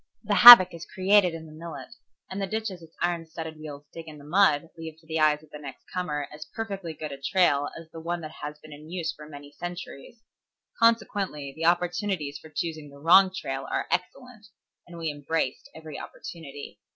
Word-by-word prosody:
The -, -, -1 dB
havoc 240 Hz, -8 st, +11 dB
is 170 Hz, 0 st, -9 dB
created 190 Hz, -2 st, +3 dB
in 160 Hz, 0 st, -9 dB
the 155 Hz, -, -13 dB
millet 165 Hz, +1 st, -9 dB, 0.4 s
and 195 Hz, +1 st, -4 dB
the 195 Hz, -, -2 dB
ditches 215 Hz, -4 st, -4 dB
its 165 Hz, 0 st, -16 dB
iron 170 Hz, -2 st, -1 dB
studded 160 Hz, -1 st, -8 dB
wheels 145 Hz, -2 st, -9 dB
dig 165 Hz, -1 st, -9 dB
in 155 Hz, -1 st, -10 dB
the 145 Hz, -, -14 dB
mud 160 Hz, -1 st, +2 dB
leave 160 Hz, -1 st, -9 dB
to 160 Hz, -, -24 dB
the 160 Hz, 0 st, -3 dB
eyes 155 Hz, 0 st, +3 dB
of 155 Hz, -, -21 dB
the 150 Hz, -, -9 dB
next 140 Hz, -3 st, -10 dB
comer 150 Hz, -6 st, -3 dB
as 150 Hz, +1 st, -10 dB
perfectly 195 Hz, -7 st, -5 dB
good 155 Hz, -1 st, -6 dB
a 140 Hz, 0 st, -9 dB
trail 145 Hz, -3 st, +2 dB
as 165 Hz, -1 st, -11 dB
the 165 Hz, -, -9 dB
one 170 Hz, +1 st, -4 dB
that 155 Hz, 0 st, -9 dB
has 150 Hz, 0 st, -6 dB
been 155 Hz, 0 st, -13 dB
in 150 Hz, +2 st, -13 dB
use 175 Hz, -2 st, -3 dB
for 150 Hz, 0 st, -13 dB
many 145 Hz, -1 st, -11 dB
centuries. 175 Hz, -, -9 dB, 0.6 s
Consequently 205 Hz, -11 st, +1 dB
the 165 Hz, -, -3 dB
opportunities 175 Hz, -3 st, 0 dB
for 160 Hz, -, -14 dB
choosing 155 Hz, -1 st, -5 dB
the 140 Hz, -, -15 dB
wrong 180 Hz, +6 st, +6 dB
trail 135 Hz, -8 st, -5 dB
are -, -, -1 dB
excellent, 215 Hz, +5 st, -4 dB, 0.4 s
and 175 Hz, -1 st, -11 dB
we 165 Hz, -2 st, -2 dB
embraced 145 Hz, -2 st, -3 dB
every 160 Hz, -2 st, -9 dB
opportunity. 145 Hz, -4 st, -10 dB
160 Hz, 200 wpm, -26 LUFS, 150-180 Hz, 0.6 s, havoc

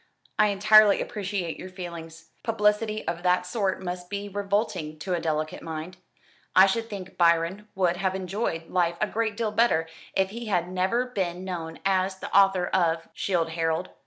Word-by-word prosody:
"I 215 Hz, -, +6 dB
entirely 210 Hz, +1 st, +6 dB
appreciate 190 Hz, -5 st, -3 dB
your 185 Hz, -, -7 dB
feelings. 165 Hz, -3 st, -9 dB
Publicity 215 Hz, -1 st, 0 dB
of 170 Hz, -, -2 dB
that 180 Hz, 0 st, +2 dB
sort 190 Hz, 0 st, -1 dB
must 180 Hz, 0 st, -5 dB
be 200 Hz, 0 st, -4 dB
revolting 200 Hz, -5 st, -2 dB
to 180 Hz, +4 st, -3 dB
a 175 Hz, -, +1 dB
delicate 155 Hz, -1 st, -2 dB
mind. 165 Hz, +3 st, -6 dB, 0.6 s
I 190 Hz, -, +9 dB
should 225 Hz, +4 st, -1 dB
think 190 Hz, -3 st, -8 dB
Byron 170 Hz, +4 st, +2 dB
would 180 Hz, -2 st, +1 dB
have 190 Hz, 0 st, 0 dB
enjoyed 185 Hz, -3 st, -3 dB
life 170 Hz, -2 st, +1 dB
a -, -, +2 dB
great 220 Hz, -1 st, -2 dB
deal 225 Hz, -2 st, -1 dB
better 210 Hz, -7 st, +2 dB, 0.3 s
if 190 Hz, 0 st, +1 dB
he 235 Hz, +1 st, -6 dB
had 180 Hz, -3 st, 0 dB
never 190 Hz, +7 st, +1 dB
been 185 Hz, -7 st, -3 dB
known 165 Hz, -3 st, -5 dB
as 190 Hz, 0 st, +1 dB
the -, -, -6 dB
author 195 Hz, -2 st, +5 dB
of 165 Hz, -3 st, 0 dB
'Childe 170 Hz, -4 st, 0 dB
Harold.' 165 Hz, +2 st, -1 dB
185 Hz, 170 wpm, -26 LUFS, 170-205 Hz, 0.6 s, I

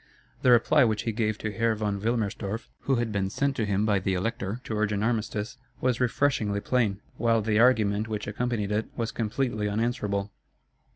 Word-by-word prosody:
The -, -, +3 dB
reply 120 Hz, +4 st, +5 dB
which 110 Hz, -3 st, +1 dB
he 115 Hz, -, -1 dB
gave 110 Hz, -1 st, -1 dB
to 110 Hz, -, -3 dB
Herr 115 Hz, +1 st, +1 dB
von 105 Hz, -2 st, -2 dB
Wilmerstorff, 110 Hz, -1 st, -2 dB, 0.2 s
who 135 Hz, -, +3 dB
had 120 Hz, -2 st, -1 dB
been 100 Hz, -2 st, 0 dB
sent 140 Hz, +6 st, 0 dB
to 110 Hz, -4 st, 0 dB
him 100 Hz, +1 st, +1 dB
by 105 Hz, -2 st, +2 dB
the 95 Hz, 0 st, -1 dB
Elector 110 Hz, +2 st, -2 dB
to 110 Hz, -, -4 dB
urge 105 Hz, 0 st, +1 dB
an 105 Hz, 0 st, -1 dB
armistice, 110 Hz, 0 st, -1 dB, 0.2 s
was 130 Hz, -1 st, 0 dB
refreshingly 120 Hz, -5 st, +1 dB
plain, 105 Hz, -3 st, 0 dB, 0.2 s
while 115 Hz, -2 st, +2 dB
the 110 Hz, 0 st, +2 dB
argument 110 Hz, -4 st, +3 dB
which 105 Hz, -2 st, -3 dB
accompanied 105 Hz, -1 st, -2 dB
it 105 Hz, +1 st, 0 dB
was 115 Hz, -2 st, -1 dB
completely 110 Hz, -1 st, -1 dB
unanswerable. 105 Hz, -2 st, -1 dB
110 Hz, 185 wpm, -27 LUFS, 105-115 Hz, 0.2 s, reply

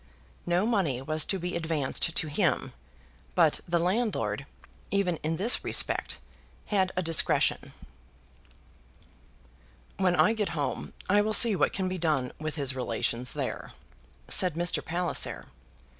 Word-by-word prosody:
No 175 Hz, +3 st, +1 dB
money 190 Hz, -, 0 dB
was 155 Hz, +3 st, -1 dB
to 195 Hz, -, -2 dB
be 180 Hz, 0 st, -4 dB
advanced 160 Hz, -1 st, -2 dB
to -, -, 0 dB
him; 145 Hz, -, -1 dB, 0.6 s
but 165 Hz, -4 st, +3 dB
the 170 Hz, 0 st, +1 dB
landlord, 200 Hz, +7 st, -1 dB, 0.4 s
even 195 Hz, -4 st, 0 dB
in 160 Hz, +2 st, -3 dB
this 220 Hz, +7 st, +4 dB
respect, -, -, 0 dB, 0.5 s
had 190 Hz, -3 st, +1 dB
a 185 Hz, -, -1 dB
discretion. 165 Hz, -1 st, +2 dB, 2.3 s
"When 185 Hz, -2 st, +2 dB
I 215 Hz, -, +4 dB
get 210 Hz, -4 st, -2 dB
home, 145 Hz, -2 st, -3 dB
I 205 Hz, +2 st, +4 dB
will 215 Hz, +1 st, -1 dB
see 220 Hz, -1 st, +6 dB
what -, -, +1 dB
can 190 Hz, -1 st, -2 dB
be 185 Hz, 0 st, -4 dB
done 150 Hz, -7 st, 0 dB
with 155 Hz, 0 st, -4 dB
his 140 Hz, -3 st, -2 dB
relations 120 Hz, 0 st, -2 dB
there," -, -, -5 dB, 0.5 s
said 180 Hz, -4 st, +6 dB
Mr. 175 Hz, +1 st, +1 dB
Palliser. 175 Hz, +1 st, -2 dB
175 Hz, 135 wpm, -28 LUFS, 155-195 Hz, 2.3 s, see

